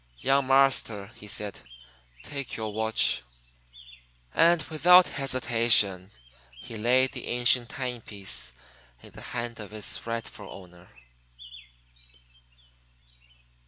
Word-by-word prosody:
"Young 135 - +1
marster," 130 -6 +2
he 105 - -13
said, 105 -1 -4 0.6
"take 140 -3 -6
yo' 110 -1 -4
watch." 110 +1 +1 1.1
And 170 +1 +4
without 175 +4 +6
hesitation 115 -8 +2 0.5
he 115 - -9
laid 125 +4 +3
the - - -6
ancient 120 0 +1
timepiece 115 - -3 0.5
in - - -12
the - - -12
hand 120 -1 -5
of 105 -2 -8
its 110 +1 -6
rightful 115 -3 -6
owner. 90 -2 -14
115 Hz, 95 wpm, -27 LUFS, 105-130 Hz, 1.1 s, without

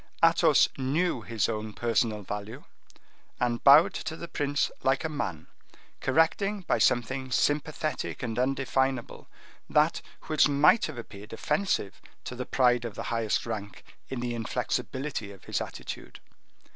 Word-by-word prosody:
Athos - - +5
knew 140 +2 0
his 110 -2 -1
own 110 0 -4
personal 115 -2 0
value, 105 +2 -6 0.8
and 120 -1 0
bowed 155 +8 +8
to 160 -3 -5
the 170 - -7
prince 145 -2 0
like 135 +3 +1
a 160 - -1
man, 95 - -4 0.5
correcting 175 +8 +1
by 180 - 0
something 130 +2 +1
sympathetic 150 +2 -1
and 115 -1 -2
undefinable 130 -1 -1 0.4
that - - +3 0.2
which 155 -1 +3
might 145 +10 +4
have 155 -5 -8
appeared 105 -2 -10
offensive 115 - -1 0.2
to - - -6
the 125 0 -5
pride 125 -2 +3
of 115 -3 -5
the - - -5
highest 115 -2 0
rank 105 -3 -6 0.3
in 130 -2 -4
the 120 -1 -2
inflexibility 120 0 -3
of 95 -2 -14
his - - -2
attitude. - - -7
125 Hz, 140 wpm, -28 LUFS, 115-145 Hz, 0.8 s, bowed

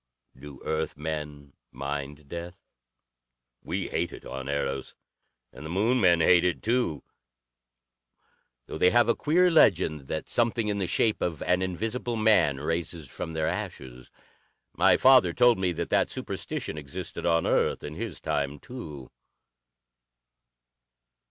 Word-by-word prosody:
Do 70 +1 -12
Earth 80 0 -2
men 75 -2 -6 0.2
mind 70 +2 -5
death? 85 +3 -7 1.1
We 90 +2 -3
hate 85 +1 -1
it - - -11
on 65 +1 -6
Eros, 70 -2 -3 0.6
and 65 - -11
the 80 - -7
Moon 110 +8 +1
men 85 -3 +4
hate 90 +1 +5
it, 90 -1 -1
too, 115 -9 0 1.6
though - - -7
they 90 - +5
have 120 +3 +4
a 115 - +4
queer 180 +4 +3
legend 80 - +3
that 80 - -4
something 115 -2 0
in 100 -1 -1
the 95 - -1
shape 110 +4 +1
of 85 -4 -2
an 90 +1 +1
invisible 115 +6 -2
man 110 -10 +3
raises 80 0 -3
from 80 - -6
their 80 -1 -1
ashes. 65 -1 -6 0.6
My - - +4
father 130 -10 +6
told 120 -3 +4
me 95 -1 +1
that 85 +1 -4
that - - +3
superstition 80 - -4
existed 70 +3 -5
on 85 -1 +2
Earth - - +1
in 75 - -6
his 105 0 -5
time, 70 0 -2
too. 75 - -9
85 Hz, 140 wpm, -27 LUFS, 75-105 Hz, 1.6 s, father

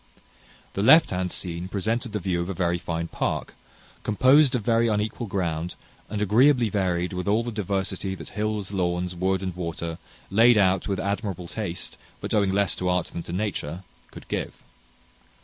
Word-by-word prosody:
The 100 - -1
left 155 +9 +7
hand 90 -1 -1
scene 85 0 -3
presented 110 +5 -2
the 105 - -1
view 90 -2 -1
of 85 - -4
a 95 - -3
very 85 -1 0
fine 85 -1 -3
park, - - -2 0.5
composed 130 +6 +5
of 120 - -1
very 115 +1 +3
unequal 110 +2 -1
ground, 85 -3 -2 0.3
and 105 0 -1
agreeably 120 +3 +4
varied 90 -3 0
with 90 +2 -3
all 110 +3 +3
the 120 - -4
diversity 95 -2 -2
that - - -10
hills, 105 -2 -2
lawns, 90 -2 -1
wood, 95 +1 0
and 95 -2 -3
water, 85 -1 -4 0.3
laid 115 +3 +6
out 95 -2 +3
with 100 -2 -1
admirable 100 -2 -3
taste, 90 -3 -4 0.2
but - - -4
owing 100 -3 +3
less 100 0 +2
to 90 - -1
art 90 0 0
than 85 - -5
to 85 - -8
nature, 90 -3 -3 0.3
could - - -12
give. - - -4
95 Hz, 175 wpm, -25 LUFS, 90-110 Hz, 0.5 s, left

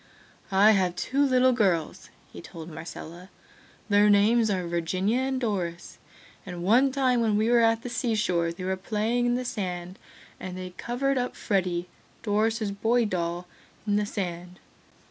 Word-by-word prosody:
"I 200 +3 +6
have 185 -4 +1
two 275 +9 0
little 255 -1 +4
girls," 190 -10 0 0.2
he - - -9
told 165 0 -10
Marcella. 165 +3 -9 0.6
"Their 205 0 +4
names 220 +3 +4
are 185 -3 -1
Virginia 185 +7 0
and 265 0 -1
Doris, 180 -8 -3 0.4
and 175 -2 -7
one 245 +8 +4
time 260 -3 +1
when 215 -2 +2
we 220 +2 +2
were 240 - +5
at 225 0 +2
the 245 - -5
sea 240 -2 -1
shore 170 -5 0
they 175 +2 -8
were 190 +1 -1
playing 220 +5 -1
in 240 - +2
the 250 0 -3
sand 185 -6 -4 0.4
and 185 -1 -6
they 185 0 -6
covered 255 +7 -1
up 250 - -3
Freddy, 180 -4 -1 0.4
Doris' 215 0 0
boy 230 +4 +1
doll 175 -2 -2 0.4
in 205 -1 +1
the 210 0 0
sand. 180 -3 -5
205 Hz, 165 wpm, -26 LUFS, 180-235 Hz, 0.6 s, I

